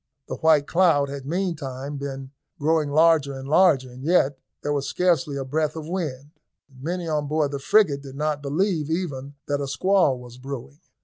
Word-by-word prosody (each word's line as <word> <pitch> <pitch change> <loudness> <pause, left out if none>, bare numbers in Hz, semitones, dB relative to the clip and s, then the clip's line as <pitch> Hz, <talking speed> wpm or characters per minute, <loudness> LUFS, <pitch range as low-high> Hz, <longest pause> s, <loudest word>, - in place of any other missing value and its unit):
The - - -5
white 155 -3 +4
cloud 160 -5 +3
had 140 -1 -7
meantime 145 -6 -3
been 135 -1 -6 0.3
growing 155 -1 +1
larger 150 -2 +3
and 135 0 -8
larger, 150 -5 +4
and 125 +1 -11
yet 145 -4 +2 0.2
there 145 - 0
was 140 -1 -1
scarcely 165 -5 +1
a 135 - -3
breath 155 +3 -1
of 155 -1 -6
wind. 150 -6 -4 0.4
Many 170 +6 -4
on 150 -2 -1
board 150 -1 0
the 140 - -3
frigate 155 -3 +3
did 135 -1 -10
not 150 0 -1
believe 155 +2 0
even 145 -5 -3
that 145 0 -1
a 140 - -2
squall 180 -1 +2
was 125 0 -12
brewing. 135 +2 -7
145 Hz, 180 wpm, -24 LUFS, 140-160 Hz, 0.4 s, white